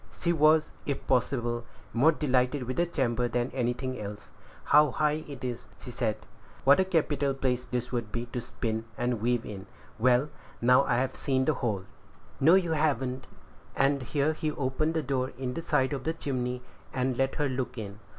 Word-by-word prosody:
She 170 -1 +1
was, 155 0 +4 0.2
if 140 -2 -2
possible, 120 -2 0 0.3
more 135 +8 +5
delighted 130 -2 +1
with 125 +1 -4
the 175 0 +2
chamber 125 -6 0
than 120 +1 -1
anything 125 +1 -2
else. 105 0 -7 0.3
"How 150 0 +6
high 150 +3 0
it 140 -2 -9
is!" 120 -3 -4
she 125 - -8
said; 115 -3 -1 0.5
"what 140 +4 +6
a 190 - +4
capital 145 -6 +1
place 125 -2 0
this 125 -1 -3
would 120 -4 -2
be 120 +2 -3
to 125 - -2
spin 110 -1 -3
and 120 -2 -1
weave 120 0 +1
in! 100 -1 -7 0.3
Well, 125 +4 +4 0.3
now 125 +3 +5
I've 130 +2 0
seen 130 -2 0
the 155 - +3
whole." 110 -8 -2 0.6
"No, 160 +6 +7
you 180 -3 +2
haven't;" 135 -5 0 0.5
and 140 0 +2
here 145 +4 0
he 155 0 -2
opened 150 +3 -1
the 160 - 0
door 130 -1 -1
in 125 -1 -3
the 165 - -4
side 130 -3 +1
of 140 - -3
the 160 - 0
chimney, 125 -5 -3 0.3
and 130 -1 0
let 135 +2 0
her 150 -2 +1
look 125 -1 -3
in. 100 -2 -6
130 Hz, 185 wpm, -29 LUFS, 120-145 Hz, 0.6 s, No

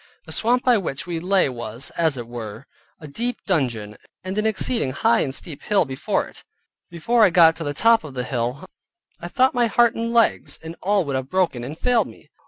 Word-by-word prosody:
The - - -11
swamp 245 +3 +1
by 245 -4 +4
which 140 -6 -4
we 170 -2 -3
lay 185 +1 +2
was, 120 -1 -6
as 160 -5 0
it 120 -2 -6
were, 115 0 -8 0.3
a 155 - -10
deep 240 +12 -3
dungeon, 120 - -1 0.3
and 185 +1 -5
an 215 +1 +1
exceeding 220 - +1
high 115 - +2
and 135 -1 -1
steep 150 -3 -6
hill 205 -5 +2
before 130 -1 -2
it. - - -14 0.5
Before 220 +8 +1
I 210 - +6
got 165 -2 +6
to 165 - -5
the 145 -1 -4
top 230 +5 +4
of 145 -4 -10
the 125 - -2
hill, 125 +6 -3 0.5
I 175 - -6
thought 260 +8 +2
my 240 -2 +2
heart 235 +2 +3
and 230 0 -3
legs, 230 -1 +2
and 160 +1 -7
all 200 -1 +1
would 140 -2 -3
have 130 0 -3
broken, 180 -10 0
and 145 +6 -7
failed 245 +2 +1
me. - - -16
165 Hz, 215 wpm, -22 LUFS, 130-215 Hz, 0.5 s, I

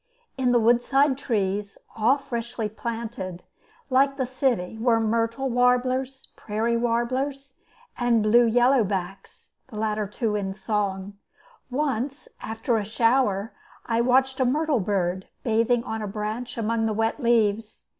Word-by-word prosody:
In 255 -2 +1
the 245 - +5
roadside 245 +5 +3
trees 205 -6 -2 0.2
all 230 +6 +3
freshly 235 -5 -4
planted, 220 -4 -5 0.5
like 275 +1 +3
the 260 - 0
city 245 -6 -1
were 230 -1 +3
myrtle 230 +4 0
warblers, 255 +2 +1
prairie 225 +2 -1
warblers, 260 +4 -1 0.4
and 240 -3 +2
blue 230 +2 +5
yellowbacks, 215 -6 0 0.2
the 250 - -12
two - - -4
latter 215 0 -1
in 195 -1 -3
song. 200 -1 -3 0.5
Once, 270 0 -2
after 225 +1 -1
a 215 - -1
shower, 225 -1 +1 0.3
I 230 0 +1
watched 260 +2 +2
a 260 - +3
myrtle 295 +1 +1
bird 190 -2 -1 0.2
bathing 230 +1 +2
on 220 -3 -4
a 210 - -3
branch 215 +5 -4
among 225 0 0
the 220 - -1
wet 225 +5 0
leaves. 225 -3 +1
230 Hz, 135 wpm, -25 LUFS, 215-255 Hz, 0.5 s, the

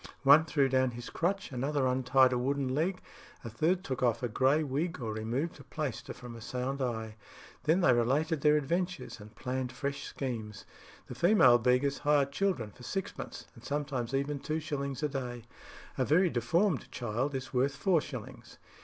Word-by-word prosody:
One 145 +3 +7
threw 145 -3 +2
down 130 -1 +2
his 120 - -7
crutch, 190 +1 -1
another 135 +2 0
untied 130 0 +4
a - - +1
wooden 135 0 -1
leg, 180 +6 -1 0.4
a 115 - -6
third 170 - +1
took 130 -8 -4
off 120 -1 +1
a - - +2
grey 135 +7 +2
wig 150 +4 -2
or 115 -3 -3
removed 120 +10 -3
a - - -11
plaister 135 -3 -4
from 120 -1 -9
a 115 - -10
sound 130 +4 -3
eye; 110 -3 -3 0.5
then 165 +5 +3
they 130 - +5
related 140 +6 +1
their 150 0 +5
adventures, 175 - -2
and 105 +2 -13
planned 125 +3 -3
fresh 140 0 -4
schemes. 115 -6 -5 0.4
The - - -8
female 170 - +5
beggars 125 +4 +2
hire 145 -1 +3
children 140 - -1
for 125 - -18
sixpence 185 +10 -5
and 115 - -16
sometimes 135 -3 -2
even 140 +1 -1
two 155 +3 -2
shillings 140 -2 -4
a 150 - +1
day: 125 -4 -5 0.6
a - - +4
very 175 +3 +3
deformed 165 - +1
child 125 +4 -2
is 130 0 -5
worth 135 +2 +1
four 180 -6 +2
shillings." - - -9
135 Hz, 180 wpm, -31 LUFS, 125-150 Hz, 0.6 s, One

